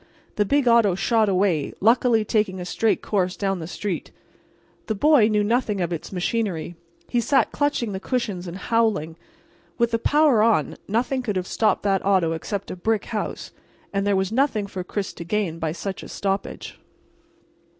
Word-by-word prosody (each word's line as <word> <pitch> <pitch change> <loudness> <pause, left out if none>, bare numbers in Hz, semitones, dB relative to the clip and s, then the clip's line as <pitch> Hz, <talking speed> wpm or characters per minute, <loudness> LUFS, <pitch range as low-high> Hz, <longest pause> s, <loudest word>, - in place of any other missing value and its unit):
The 210 - +2
big 280 +4 +2
auto 230 -6 +5
shot 220 +2 +2
away, 185 -6 +1
luckily 230 0 +3
taking 210 -4 0
a 180 - -5
straight 220 +4 0
course 185 -3 0
down 195 -2 -1
the 160 - -6
street. 190 +1 -4 0.8
The 220 - -1
boy 280 0 +5
knew 210 -1 +2
nothing 220 -2 0
of 175 -1 -1
its 165 - -6
machinery; 180 -3 -2 0.3
he 240 - +1
sat 270 0 +2
clutching 290 -6 0
the 190 - -4
cushions 205 -6 -2
and 175 +2 -6
howling. 210 -8 0 0.6
With 235 -1 +2
the 230 - +1
power 290 -3 +4
on 225 0 +2
nothing 245 +5 0
could 215 -5 -3
have 185 -1 -1
stopped 215 +3 +1
that 195 -2 +1
auto 190 -4 +2
except 195 +5 -4
a - - -4
brick 215 +3 -1
house, 215 - -4 0.4
and 200 0 0
there 200 - +3
was 190 +1 0
nothing 245 -4 +1
for 190 -2 -6
Chris 195 +1 -4
to - - -8
gain 170 -2 -2
by 160 -2 -1
such 190 +3 -5
a - - -9
stoppage. 195 0 -4
205 Hz, 180 wpm, -23 LUFS, 185-230 Hz, 0.8 s, auto